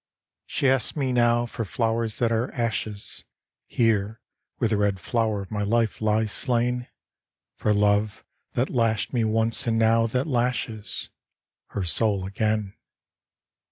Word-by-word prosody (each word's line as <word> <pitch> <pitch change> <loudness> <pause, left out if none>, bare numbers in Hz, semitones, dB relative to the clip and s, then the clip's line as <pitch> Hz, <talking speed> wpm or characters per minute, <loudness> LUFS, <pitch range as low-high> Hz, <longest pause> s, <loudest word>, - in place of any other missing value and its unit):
She 140 - 0
asks 135 +3 +1
me 135 -3 0
now 120 0 +3
for 115 -1 -4
flowers 115 +1 0
that 115 -1 +1
are 115 +2 0
ashes, 110 -4 -3 0.4
Here 110 -2 +1 0.4
where - - +1
the 110 - +1
red 100 -2 +1
flow'r 110 0 0
of 95 - -14
my 105 -1 -2
life 110 +2 +1
lies 110 0 +1
slain: 125 0 0 0.7
For 105 - 0
love, 105 0 +2 0.3
that 125 +3 0
lashed 115 -3 +1
me 120 -2 +2
once 110 +2 +1
and 115 -1 +2
now 115 0 +4
that 125 +4 0
lashes 120 -5 -2 0.6
Her 100 - -3
soul 100 +2 +1
again. 105 0 -1
115 Hz, 140 wpm, -25 LUFS, 105-120 Hz, 0.7 s, now